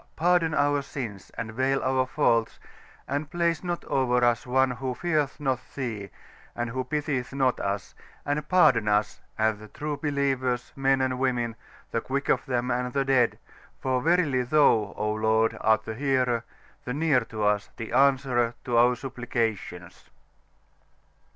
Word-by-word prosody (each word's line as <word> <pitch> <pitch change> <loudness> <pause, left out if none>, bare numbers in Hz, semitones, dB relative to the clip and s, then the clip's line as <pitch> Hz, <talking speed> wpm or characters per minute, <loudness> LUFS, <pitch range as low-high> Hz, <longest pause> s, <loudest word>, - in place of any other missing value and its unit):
pardon 175 -1 +2
our 145 0 +2
Sins, 115 -8 -7
and 110 -1 -4
veil 135 +3 +1
our 130 0 +1
Faults, 115 -6 +1 0.5
and 145 +1 -2
place 170 -1 0
not 175 -1 -3
over 125 -2 +1
us 120 0 +1
one 130 +1 +3
who 130 0 -4
feareth 155 -4 -1
not 135 -3 0 0.2
Thee, 110 -7 -4 0.5
and 120 -1 -3
who 130 +2 -2
pitieth 140 -1 -2
not 130 -2 +1
us, 100 0 -3 0.3
and 150 +1 -2
pardon 150 -12 +4
us, 105 0 +1 0.2
and 110 -1 +1
the 110 - -11
true 150 +7 -4
Believers, 135 -4 -1
Men 135 0 +2
and 130 -1 0
Women, 120 -3 0 0.4
the 115 - 0
Quick 140 +3 -3
of - - +1
them 125 -1 -1
and 125 +1 -1
the 140 -1 +1
Dead: 130 -3 +3 0.4
for 130 -1 0
verily 155 -5 +2
Thou, 120 -6 +3
O 105 0 0
Lord, 110 +1 +2
art 110 0 +3
the 110 - -4
Hearer, 125 -2 0 0.4
the 125 - -4
near 150 -3 +3
to 110 -2 -5
us, 105 0 +1
the 115 -2 -6
Answerer 130 -3 +3
of 120 - -1
our 120 +1 +5
Supplications." 115 -8 -4
130 Hz, 155 wpm, -26 LUFS, 115-140 Hz, 0.5 s, our